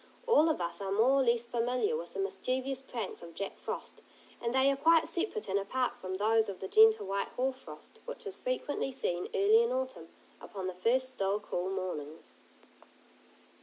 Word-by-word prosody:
All 330 Hz, -10 st, +5 dB
of 315 Hz, -, 0 dB
us 170 Hz, +2 st, -3 dB
are 195 Hz, -1 st, -3 dB
more 225 Hz, +6 st, +4 dB
or -, -, +3 dB
less 235 Hz, -1 st, +2 dB
familiar 245 Hz, -, 0 dB
with 485 Hz, -, -6 dB
the -, -, -3 dB
mischievous 265 Hz, -8 st, -2 dB
pranks 235 Hz, -6 st, -5 dB
of 170 Hz, -1 st, -11 dB
Jack 200 Hz, -, -4 dB
Frost, -, -, -6 dB, 0.4 s
and 235 Hz, -, -1 dB
they 265 Hz, +2 st, +4 dB
are -, -, 0 dB
quite 325 Hz, +3 st, +4 dB
separate 425 Hz, +5 st, -2 dB
and 195 Hz, +1 st, +1 dB
apart 250 Hz, +6 st, -1 dB
from 185 Hz, 0 st, -5 dB
those 220 Hz, +2 st, +2 dB
of 190 Hz, -, -6 dB
the 190 Hz, -, -5 dB
gentle 440 Hz, -, +6 dB
white 195 Hz, +1 st, -1 dB
hoar 260 Hz, +1 st, +1 dB
frost, 255 Hz, -, -13 dB
which -, -, -7 dB
is 400 Hz, -2 st, -5 dB
frequently 455 Hz, -, -2 dB
seen 180 Hz, -9 st, -2 dB
early 210 Hz, +4 st, +5 dB
in 235 Hz, -, +1 dB
autumn, 260 Hz, -10 st, -3 dB, 0.3 s
upon 195 Hz, -4 st, -7 dB
the 185 Hz, -, -3 dB
first 250 Hz, +8 st, +1 dB
still, 200 Hz, -4 st, -1 dB
cool 185 Hz, -3 st, -3 dB
mornings. 175 Hz, -6 st, -5 dB
235 Hz, 190 wpm, -31 LUFS, 195-270 Hz, 0.4 s, gentle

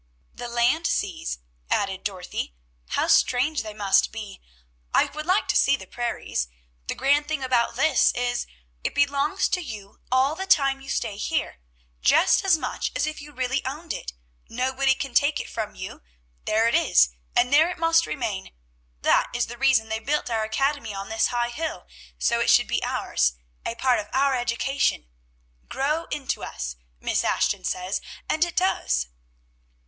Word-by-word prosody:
"The 245 Hz, -, -6 dB
land 240 Hz, +7 st, +2 dB
seas," 160 Hz, -, -2 dB, 0.3 s
added 195 Hz, -1 st, 0 dB
Dorothy. 180 Hz, -, -4 dB, 0.3 s
"How -, -, +1 dB
strange 275 Hz, +5 st, +3 dB
they 215 Hz, -1 st, -8 dB
must 200 Hz, -2 st, +3 dB
be! 210 Hz, -3 st, -8 dB, 0.5 s
I -, -, +5 dB
would 305 Hz, +1 st, -7 dB
like 375 Hz, +3 st, +2 dB
to -, -, +2 dB
see 280 Hz, -, +5 dB
the -, -, -10 dB
prairies. 235 Hz, -, -3 dB, 0.4 s
"The -, -, -2 dB
grand 285 Hz, +2 st, +2 dB
thing 305 Hz, -3 st, -2 dB
about 245 Hz, -3 st, +1 dB
this 270 Hz, +1 st, +4 dB
is, 245 Hz, 0 st, -1 dB, 0.4 s
it -, -, -2 dB
belongs 285 Hz, +6 st, +2 dB
to 360 Hz, -, 0 dB
you 215 Hz, -, -9 dB
all 260 Hz, +3 st, +3 dB
the 380 Hz, +4 st, -5 dB
time 275 Hz, -6 st, +3 dB
you 270 Hz, -, -11 dB
stay 200 Hz, -, -2 dB
here, 315 Hz, -, -2 dB, 0.4 s
just -, -, +4 dB
as 380 Hz, -4 st, +4 dB
much -, -, -3 dB
as -, -, +1 dB
if 310 Hz, -1 st, -5 dB
you 295 Hz, +1 st, -11 dB
really 260 Hz, 0 st, -1 dB
owned 305 Hz, +6 st, -4 dB
it; -, -, -6 dB, 0.4 s
nobody 265 Hz, +2 st, +1 dB
can 270 Hz, -2 st, -5 dB
take 285 Hz, +4 st, +3 dB
it -, -, -5 dB
from 220 Hz, -2 st, -5 dB
you; 185 Hz, -, -8 dB, 0.4 s
there 220 Hz, +2 st, +3 dB
it 235 Hz, -, +1 dB
is, 60 Hz, 0 st, +5 dB, 0.3 s
and 250 Hz, +3 st, +3 dB
there 315 Hz, +4 st, +6 dB
it 360 Hz, -, -5 dB
must 330 Hz, 0 st, +3 dB
remain. 220 Hz, -9 st, -4 dB, 0.5 s
That -, -, +3 dB
is 240 Hz, -, +1 dB
the 240 Hz, +1 st, -9 dB
reason 265 Hz, -5 st, +4 dB
they 220 Hz, 0 st, -1 dB
built 280 Hz, +1 st, -1 dB
our 220 Hz, -1 st, +1 dB
academy 230 Hz, 0 st, -1 dB
on 195 Hz, 0 st, -6 dB
this 220 Hz, 0 st, +2 dB
high 240 Hz, -1 st, -1 dB
hill, 315 Hz, +5 st, -4 dB, 0.3 s
so 60 Hz, +1 st, +1 dB
it -, -, +1 dB
should -, -, +5 dB
be -, -, -1 dB
ours, -, -, +1 dB, 0.3 s
a 230 Hz, -, -3 dB
part 250 Hz, +1 st, +2 dB
of 210 Hz, -, -5 dB
our 275 Hz, 0 st, +3 dB
education, 245 Hz, -, 0 dB, 0.6 s
'Grow 300 Hz, +5 st, 0 dB
into 285 Hz, -3 st, -3 dB
us,' -, -, -5 dB, 0.2 s
Miss -, -, 0 dB
Ashton -, -, +1 dB
says, 185 Hz, +2 st, -2 dB, 0.3 s
and 315 Hz, -, +2 dB
it 345 Hz, -1 st, -2 dB
does." 65 Hz, -, +1 dB
255 Hz, 175 wpm, -25 LUFS, 220-290 Hz, 0.6 s, there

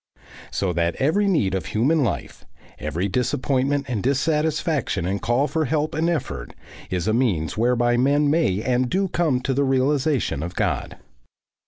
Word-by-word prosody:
So 95 Hz, -3 st, -1 dB
that 85 Hz, 0 st, 0 dB
every 195 Hz, +9 st, +1 dB
need 130 Hz, -, +1 dB
of 95 Hz, -, -2 dB
human 140 Hz, +8 st, +2 dB
life, 115 Hz, -, -3 dB, 0.4 s
every 80 Hz, +6 st, -2 dB
disappointment 130 Hz, +5 st, 0 dB
and 120 Hz, -6 st, -2 dB
dissatisfaction 150 Hz, -, 0 dB
and 95 Hz, +2 st, -2 dB
call 120 Hz, +5 st, +1 dB
for 155 Hz, +3 st, -1 dB
help 150 Hz, +2 st, -1 dB
and 160 Hz, +3 st, +1 dB
effort, 135 Hz, -, -4 dB, 0.3 s
is 90 Hz, +1 st, -2 dB
a 110 Hz, -, +2 dB
means 95 Hz, -, 0 dB
whereby 120 Hz, +1 st, +2 dB
men 140 Hz, +4 st, +3 dB
may 145 Hz, -, +1 dB
and 125 Hz, 0 st, +1 dB
do 190 Hz, +4 st, 0 dB
come 160 Hz, -7 st, +1 dB
to 135 Hz, -, -1 dB
the 140 Hz, +2 st, +1 dB
realisation 135 Hz, -, +1 dB
of 85 Hz, +3 st, -5 dB
God. -, -, -2 dB
130 Hz, 160 wpm, -23 LUFS, 105-150 Hz, 0.4 s, men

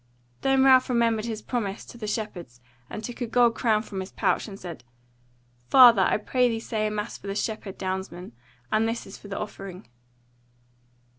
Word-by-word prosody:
Then 270 Hz, 0 st, +3 dB
Ralph 260 Hz, -1 st, +6 dB
remembered 230 Hz, -3 st, +2 dB
his 220 Hz, -2 st, -5 dB
promise 210 Hz, -5 st, -3 dB
to -, -, -12 dB
the 225 Hz, -3 st, -6 dB
shepherds 185 Hz, -, -5 dB, 0.3 s
and 215 Hz, -, -6 dB
took 245 Hz, +2 st, -7 dB
a 240 Hz, -, -1 dB
gold 240 Hz, 0 st, +4 dB
crown 220 Hz, -2 st, +1 dB
from 200 Hz, -3 st, -6 dB
his 190 Hz, 0 st, -6 dB
pouch, -, -, 0 dB
and 200 Hz, -2 st, -9 dB
said: 170 Hz, -9 st, -8 dB, 0.9 s
"Father, 240 Hz, -6 st, +8 dB
I -, -, +3 dB
pray 250 Hz, +4 st, +1 dB
thee 225 Hz, -1 st, -2 dB
say 215 Hz, -1 st, -2 dB
a -, -, -1 dB
mass 210 Hz, +1 st, -4 dB
for -, -, -10 dB
the 195 Hz, -, -3 dB
shepherd 210 Hz, -2 st, -3 dB
downsmen; 185 Hz, -3 st, -4 dB, 0.4 s
and 220 Hz, +1 st, +2 dB
this 230 Hz, +1 st, -4 dB
is 195 Hz, -, -11 dB
for -, -, -12 dB
the 195 Hz, -, -5 dB
offering." 195 Hz, -, -7 dB
215 Hz, 190 wpm, -26 LUFS, 195-235 Hz, 0.9 s, Father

